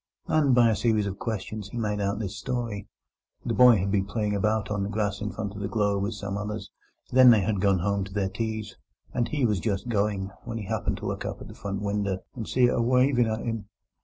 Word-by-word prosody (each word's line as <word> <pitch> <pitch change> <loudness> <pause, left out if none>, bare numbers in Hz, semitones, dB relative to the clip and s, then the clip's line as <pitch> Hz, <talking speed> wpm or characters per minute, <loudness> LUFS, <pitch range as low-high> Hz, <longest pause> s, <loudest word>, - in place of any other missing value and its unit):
And 145 -5 +3
by 120 -2 +6
a - - +1
series 105 0 +2
of 100 0 -4
questions 110 -2 -4
he 120 - -7
made 105 -2 -1
out 100 +1 0
this 105 -2 -4
story: 115 -2 -3 0.6
The - - 0
boy 125 -2 +7
had 95 +1 -1
been 95 -1 +2
playing 105 0 -1
about 105 +1 0
on 105 -1 0
the 100 - -2
grass 105 -1 -1
in 105 - -2
front 100 +1 -4
of 100 - -7
the 100 - -1
Globe 100 -2 +1
with 105 +2 -2
some 100 0 -4
others; 105 -1 -5 0.4
then 130 0 +8
they 110 -4 +6
had 100 0 0
gone 100 -1 +4
home 100 +2 0
to 95 - -11
their 100 -2 0
teas, 110 +1 -4 0.4
and 120 - 0
he 145 -4 0
was 105 -4 +1
just 105 +3 -2
going, 100 -3 0
when 115 -1 -5
he 105 - -5
happened - - -1
to - - -7
look - - -3
up - - -5
at - - -9
the - - -9
front 100 0 -5
winder 100 -2 0 0.2
and 115 -4 -6
see 130 - +2
it 120 - +3
a - - +1
wiving 125 0 +3
at 110 0 -2
him. 115 -3 -3
105 Hz, 250 wpm, -27 LUFS, 100-115 Hz, 0.6 s, then